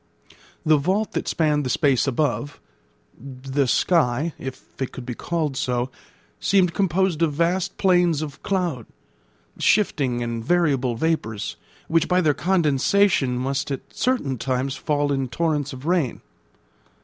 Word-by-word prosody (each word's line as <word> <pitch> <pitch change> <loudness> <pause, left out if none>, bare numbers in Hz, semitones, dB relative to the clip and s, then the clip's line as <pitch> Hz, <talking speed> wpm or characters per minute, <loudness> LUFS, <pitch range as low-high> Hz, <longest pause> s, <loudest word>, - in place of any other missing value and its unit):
The 155 -1 +5
vault 190 +9 0
that - - -3
spanned 150 -2 +1
the 130 - -2
space 140 -1 +2
above, 135 0 -1 0.6
the 135 +2 -2
sky, 155 +1 +2
if 130 -1 -7 0.2
it 130 - -2
could 125 - -8
be 125 - -4
called 155 +1 -2
so, 125 -1 -1 0.5
seemed 185 -4 +3
composed 190 -3 +1
of 160 -3 +2
vast 170 +4 0
plains 175 -5 +3
of 145 -2 -8
cloud, 175 - -2 0.7
shifting 135 - +2
and 115 -1 -3
variable 135 -6 +1
vapours, 115 -7 -2 0.3
which 165 -1 +2
by 180 0 +3
their 155 -5 +3
condensation 165 -4 +2
must 135 +2 -2
at 135 -2 -6
certain 145 - 0
times 130 +1 -1
fall 145 +1 0
in 135 -2 0
torrents 150 +2 -1
of 130 +1 -9
rain. 165 -7 0
145 Hz, 135 wpm, -23 LUFS, 130-170 Hz, 0.7 s, The